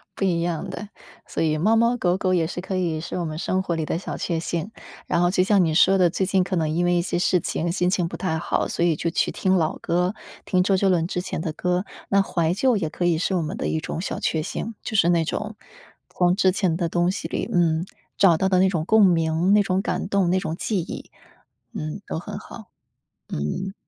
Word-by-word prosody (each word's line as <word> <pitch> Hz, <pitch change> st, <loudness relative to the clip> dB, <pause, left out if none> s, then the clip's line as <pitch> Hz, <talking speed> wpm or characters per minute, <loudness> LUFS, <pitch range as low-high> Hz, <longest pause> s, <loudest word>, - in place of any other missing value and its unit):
不 195 Hz, -, -1 dB
一 170 Hz, -3 st, +1 dB
样 170 Hz, -2 st, -2 dB
的， 205 Hz, -, -7 dB, 0.4 s
所 -, -, -2 dB
以 155 Hz, -1 st, +1 dB
猫 210 Hz, +8 st, +3 dB
猫 235 Hz, +2 st, +3 dB
狗 180 Hz, -5 st, +1 dB
狗 185 Hz, -1 st, 0 dB
也 165 Hz, -3 st, +2 dB
是 175 Hz, -, -5 dB
可 190 Hz, +1 st, -4 dB
以 170 Hz, -4 st, -1 dB
是 175 Hz, -, -5 dB
我 175 Hz, -, -2 dB
们 155 Hz, -1 st, -5 dB
生 185 Hz, +3 st, 0 dB
活 175 Hz, -3 st, -2 dB
里 160 Hz, -1 st, -2 dB
的 160 Hz, -, -1 dB
小 180 Hz, -, -5 dB
确 170 Hz, -3 st, -2 dB
幸。 170 Hz, +4 st, -3 dB, 0.4 s
然 170 Hz, -, +1 dB
后 175 Hz, -, +3 dB
就 185 Hz, -1 st, +3 dB
像 195 Hz, -1 st, +4 dB
你 160 Hz, -, 0 dB
说 190 Hz, +3 st, +5 dB
的， 180 Hz, -2 st, +4 dB
最 190 Hz, +3 st, -1 dB
近 190 Hz, 0 st, +2 dB
可 185 Hz, +1 st, -2 dB
能 160 Hz, -3 st, 0 dB
因 170 Hz, +3 st, 0 dB
为 175 Hz, 0 st, +2 dB
一 175 Hz, -, +2 dB
些 175 Hz, 0 st, -2 dB
事 180 Hz, 0 st, +3 dB
情 170 Hz, +1 st, -2 dB
心 180 Hz, 0 st, +1 dB
情 180 Hz, -2 st, +1 dB
不 -, -, -7 dB
太 180 Hz, -4 st, -1 dB
好， -, -, -1 dB
所 -, -, -2 dB
以 170 Hz, -2 st, +2 dB
就 170 Hz, -, -2 dB
去 165 Hz, -, 0 dB
听 190 Hz, 0 st, +1 dB
老 160 Hz, -4 st, 0 dB
歌， 180 Hz, +4 st, 0 dB, 0.3 s
听 180 Hz, -2 st, +2 dB
周 195 Hz, +1 st, +2 dB
杰 195 Hz, +1 st, +2 dB
伦 170 Hz, -3 st, +2 dB
之 180 Hz, -, -2 dB
前 180 Hz, -, -4 dB
的 160 Hz, -1 st, -3 dB
歌， 180 Hz, +3 st, -1 dB, 0.2 s
那 200 Hz, 0 st, +4 dB
怀 170 Hz, -3 st, 0 dB
旧 245 Hz, +4 st, +2 dB
也 165 Hz, -6 st, -2 dB
可 175 Hz, -, -3 dB
以 170 Hz, -2 st, +3 dB
是 185 Hz, +3 st, 0 dB
我 175 Hz, -, +1 dB
们 155 Hz, -, -4 dB
的 -, -, -2 dB
一 160 Hz, -, 0 dB
种 160 Hz, -, -4 dB
小 195 Hz, -, -4 dB
确 160 Hz, -, 0 dB
幸。 225 Hz, +8 st, -4 dB
就 220 Hz, -, -5 dB
是 175 Hz, -4 st, +4 dB
那 170 Hz, -2 st, +3 dB
种， 210 Hz, +6 st, -4 dB, 0.5 s
从 180 Hz, 0 st, +2 dB
之 190 Hz, -2 st, +3 dB
前 185 Hz, -3 st, 0 dB
的 170 Hz, -2 st, -1 dB
东 175 Hz, +2 st, +1 dB
西 -, -, -4 dB
里， -, -, -3 dB
嗯， 170 Hz, -1 st, +2 dB, 0.3 s
找 175 Hz, -5 st, +5 dB
到 190 Hz, +3 st, +1 dB
的 185 Hz, -1 st, +3 dB
那 190 Hz, -, +5 dB
种 165 Hz, -4 st, -2 dB
共 220 Hz, +2 st, +5 dB
鸣， 165 Hz, +1 st, +2 dB
那 210 Hz, -, +6 dB
种 185 Hz, 0 st, 0 dB
感 -, -, -2 dB
动， 195 Hz, -3 st, +2 dB
那 185 Hz, -, +2 dB
种 165 Hz, -4 st, -3 dB
记 205 Hz, 0 st, -1 dB
忆 -, -, -8 dB, 0.6 s
嗯， 75 Hz, -1 st, -5 dB
都 -, -, -3 dB
很 -, -, -7 dB
好， -, -, -11 dB, 0.6 s
嗯。 130 Hz, -, -3 dB
180 Hz, 270 characters per minute, -23 LUFS, 165-190 Hz, 0.6 s, 那